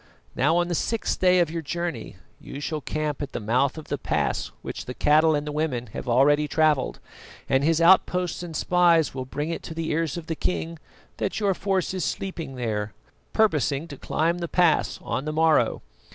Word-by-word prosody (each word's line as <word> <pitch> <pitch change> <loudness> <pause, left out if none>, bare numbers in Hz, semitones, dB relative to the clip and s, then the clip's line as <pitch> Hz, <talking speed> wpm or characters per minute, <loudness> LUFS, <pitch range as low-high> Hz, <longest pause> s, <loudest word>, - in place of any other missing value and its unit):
Now, 150 +6 +3
on 175 0 +2
the 175 - -2
sixth 225 +6 -1
day 185 0 +4
of 170 -3 +2
your 165 0 -3
journey 170 - -4 0.2
you 140 - -8
shall 150 +1 -3
camp 150 -1 -3
at 140 -1 -5
the - - -2
mouth 125 +7 +1
of 155 - -9
the 145 - -2
pass - - -1 0.2
which - - -6
the 125 - -6
cattle 155 +1 +4
and 145 0 -2
the 150 - -4
women 145 -6 -2
have 125 - -5
already 145 +5 +4
travelled, 155 -3 +1 0.5
and 135 +1 +2
his 165 +1 +3
outposts 180 0 +3
and 170 -2 -7
spies 170 -2 +3
will 130 -1 -4
bring 145 +5 -3
it 165 - -4
to 160 - -8
the 165 -1 -2
ears 160 0 -1
of 170 - -6
the 160 - -3
king 165 -1 -3 0.4
that - - -2
your 200 -2 +2
force 190 0 -1
is 185 -3 -2
sleeping 180 -8 -4
there, 110 -4 -3 0.4
purposing 155 - +1
to 145 - -7
climb 165 +5 -1
the 170 - -3
pass 175 -2 +2
on 135 - -3
the 155 - -2
morrow. 160 0 +2
160 Hz, 200 wpm, -25 LUFS, 145-170 Hz, 0.5 s, day